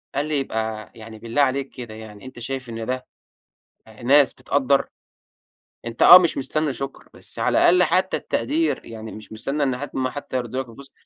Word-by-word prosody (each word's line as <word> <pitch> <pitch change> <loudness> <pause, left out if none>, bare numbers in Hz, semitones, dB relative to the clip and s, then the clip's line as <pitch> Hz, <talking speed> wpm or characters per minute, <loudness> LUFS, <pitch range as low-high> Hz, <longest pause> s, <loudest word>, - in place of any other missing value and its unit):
قال 145 +2 0
لي: 155 -1 -1
"يبقى 110 -5 -3
يعني 110 -1 -11
بالله 115 +6 -1
عليك 135 0 +1
كده 120 -4 -9
يعني، 110 0 -11
أنت 130 -1 -10
شايف 130 +1 -5
إن 115 -1 -5
ده 130 +1 -4 0.8
آآ، 110 0 -15
ناس 140 +2 +5
بتقدر؟ 140 0 +1 1.0
أنت 115 0 -6
آه، 180 - +11
مش 180 -2 +1
مستنى 145 +2 -1
شكر، 135 +2 -7
بس - - -11
على - - +1
الأقل 180 +1 +5
حتّى 185 +1 +1
التقدير، 320 +3 -1
يعني 110 -1 -8
مش 105 0 -11
مستنى 135 +7 -2
إن 130 -3 0
حد 145 +3 -6
أمّا 130 -1 0
حتّى 135 -1 -5
يردوا 125 +1 -3
لك 125 - -18
الفلوس" 135 +4 -13
130 Hz, 190 wpm, -22 LUFS, 115-140 Hz, 1.0 s, آه